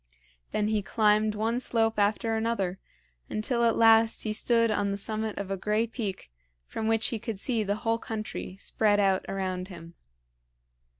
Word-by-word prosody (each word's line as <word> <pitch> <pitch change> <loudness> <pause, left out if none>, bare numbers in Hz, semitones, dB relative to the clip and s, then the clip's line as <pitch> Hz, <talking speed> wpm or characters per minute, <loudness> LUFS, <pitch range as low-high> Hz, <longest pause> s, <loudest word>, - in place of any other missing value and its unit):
Then 210 0 0
he 215 -1 +1
climbed 215 +1 +2
one 225 +3 -1
slope 225 -3 0
after 215 +2 +1
another, 220 -5 -2 0.5
until 235 +3 0
at 230 - +3
last 225 0 +5
he 215 - -2
stood 230 0 +3
on 205 -1 0
the 200 - -2
summit 215 +1 -1
of 200 -1 -5
a 195 - -1
gray 210 +4 0
peak 210 - -6 0.3
from 220 - -4
which 225 0 +2
he 230 - -3
could 210 -2 -5
see 235 0 +1
the 205 -1 -1
whole 225 0 +1
country 215 -4 -6
spread 205 +1 +1
out 195 -2 +2
around 185 -1 -3
him. 170 -3 -11
215 Hz, 170 wpm, -27 LUFS, 200-225 Hz, 0.5 s, last